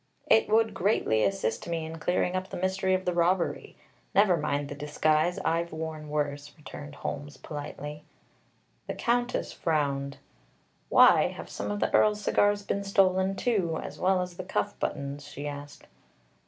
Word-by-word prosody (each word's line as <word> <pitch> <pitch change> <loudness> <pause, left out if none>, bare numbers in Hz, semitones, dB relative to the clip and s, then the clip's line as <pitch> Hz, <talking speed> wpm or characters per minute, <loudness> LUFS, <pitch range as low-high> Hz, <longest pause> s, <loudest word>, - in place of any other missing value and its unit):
It 220 - +4
would 225 +1 +3
greatly 175 - +2
assist 195 0 -1
me 165 -2 -2
in 160 +1 -7
clearing 180 +2 0
up 185 0 -3
the - - -5
mystery 190 +1 +1
of 185 - -3
the 180 - +1
robbery. 175 +1 0 0.4
Never 195 -2 +5
mind 145 -2 -1
the 145 - -6
disguise. 155 +3 +1
I've 170 +1 0
worn 160 -1 -5
worse," 145 -1 -2
returned 145 -1 -9
Holmes 145 0 -5
politely. 150 0 -7 0.8
The - - -3
Countess 245 0 0
frowned. 140 -3 -1 0.7
"Why, - - +7
have - - -8
some 100 +1 -4
of 105 0 -2
the - - 0
Earl's 210 -1 +4
cigars 205 0 +2
been 200 0 -2
stolen, 195 -1 +2
too, 190 -9 0
as - - -8
well 185 0 +2
as 180 -1 -9
the - - -4
cuff - - -1
buttons?" 140 +1 -4
she 145 0 -6
asked. 145 0 -8
165 Hz, 160 wpm, -28 LUFS, 145-190 Hz, 0.8 s, Why